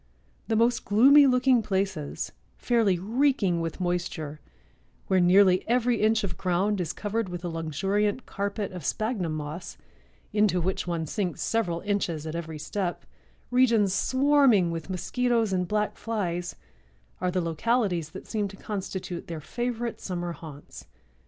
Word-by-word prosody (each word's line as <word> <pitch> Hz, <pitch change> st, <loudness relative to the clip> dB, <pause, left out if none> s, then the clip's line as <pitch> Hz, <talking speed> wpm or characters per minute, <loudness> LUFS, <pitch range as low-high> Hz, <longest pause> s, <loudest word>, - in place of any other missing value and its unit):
The 225 Hz, -, +1 dB
most 230 Hz, +1 st, +2 dB
gloomy 275 Hz, +7 st, +7 dB
looking 250 Hz, -1 st, +4 dB
places, 190 Hz, -7 st, -2 dB, 0.3 s
fairly 225 Hz, -7 st, +2 dB
reeking 210 Hz, -3 st, +1 dB
with 165 Hz, +2 st, -4 dB
moisture, 175 Hz, -4 st, -2 dB, 0.7 s
where 190 Hz, -, +2 dB
nearly 185 Hz, +1 st, +5 dB
every 245 Hz, -1 st, +2 dB
inch 220 Hz, 0 st, +3 dB
of 175 Hz, -3 st, -4 dB
ground 190 Hz, +2 st, +1 dB
is 165 Hz, -, -2 dB
covered 215 Hz, 0 st, -2 dB
with 175 Hz, 0 st, -6 dB
a -, -, -2 dB
luxuriant 195 Hz, -, -1 dB
carpet 200 Hz, 0 st, -3 dB
of 180 Hz, -1 st, -7 dB
spagnum 215 Hz, -, -1 dB
moss, 155 Hz, +3 st, -6 dB, 0.6 s
into 210 Hz, -4 st, +3 dB
which 180 Hz, +1 st, -2 dB
one 170 Hz, -2 st, -1 dB
sinks 180 Hz, 0 st, -2 dB
several 175 Hz, -7 st, 0 dB
inches 185 Hz, -6 st, -1 dB
at 155 Hz, -, -4 dB
every 160 Hz, -2 st, -5 dB
step, 175 Hz, +4 st, -3 dB, 0.5 s
regions 230 Hz, -6 st, +4 dB
swarming 260 Hz, -6 st, +4 dB
with 165 Hz, +1 st, -5 dB
mosquitoes 230 Hz, +3 st, 0 dB
and 180 Hz, -1 st, 0 dB
black 210 Hz, +1 st, 0 dB
flies, 180 Hz, -6 st, -3 dB, 0.6 s
are 180 Hz, -, 0 dB
the 185 Hz, +1 st, 0 dB
localities 175 Hz, 0 st, 0 dB
that 185 Hz, -, -10 dB
seem 210 Hz, -2 st, -1 dB
to 195 Hz, 0 st, -11 dB
constitute 190 Hz, -4 st, -5 dB
their 165 Hz, -2 st, -5 dB
favorite 240 Hz, -, -3 dB
summer 175 Hz, -2 st, -3 dB
haunts." 155 Hz, -4 st, -11 dB
195 Hz, 145 wpm, -27 LUFS, 175-225 Hz, 0.7 s, gloomy